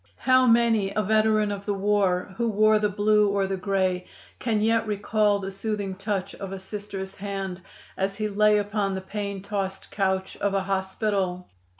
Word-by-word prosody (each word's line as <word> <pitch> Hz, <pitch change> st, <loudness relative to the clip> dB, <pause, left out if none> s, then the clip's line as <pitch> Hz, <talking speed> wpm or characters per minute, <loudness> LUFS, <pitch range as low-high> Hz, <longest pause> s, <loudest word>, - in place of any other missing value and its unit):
"How 255 Hz, 0 st, +4 dB
many 230 Hz, -4 st, +3 dB
a 215 Hz, -, +1 dB
veteran 215 Hz, 0 st, +2 dB
of 200 Hz, 0 st, -6 dB
the 205 Hz, -, 0 dB
war, 195 Hz, -2 st, +1 dB
who 235 Hz, -1 st, +1 dB
wore 215 Hz, 0 st, +4 dB
the 210 Hz, 0 st, +1 dB
Blue 210 Hz, +1 st, +3 dB
or 200 Hz, -1 st, +1 dB
the 195 Hz, 0 st, -2 dB
Gray, 185 Hz, -1 st, 0 dB, 0.3 s
can 225 Hz, -3 st, 0 dB
yet 225 Hz, +1 st, +2 dB
recall 210 Hz, 0 st, +1 dB
the 195 Hz, -1 st, -5 dB
soothing 200 Hz, -1 st, -3 dB
touch 195 Hz, 0 st, -3 dB
of 195 Hz, -1 st, -7 dB
a 195 Hz, -, -4 dB
Sister's 195 Hz, 0 st, -7 dB
hand 195 Hz, -2 st, -4 dB, 0.3 s
as 195 Hz, +1 st, -1 dB
he 215 Hz, +1 st, -1 dB
lay 210 Hz, +1 st, +4 dB
upon 205 Hz, -1 st, -1 dB
the 190 Hz, -, -4 dB
pain 200 Hz, 0 st, -5 dB
tossed 195 Hz, -1 st, -4 dB
couch 190 Hz, -1 st, -1 dB
of 200 Hz, -1 st, 0 dB
a 195 Hz, -, +1 dB
hospital! 190 Hz, -1 st, -1 dB
200 Hz, 180 wpm, -25 LUFS, 190-210 Hz, 0.3 s, How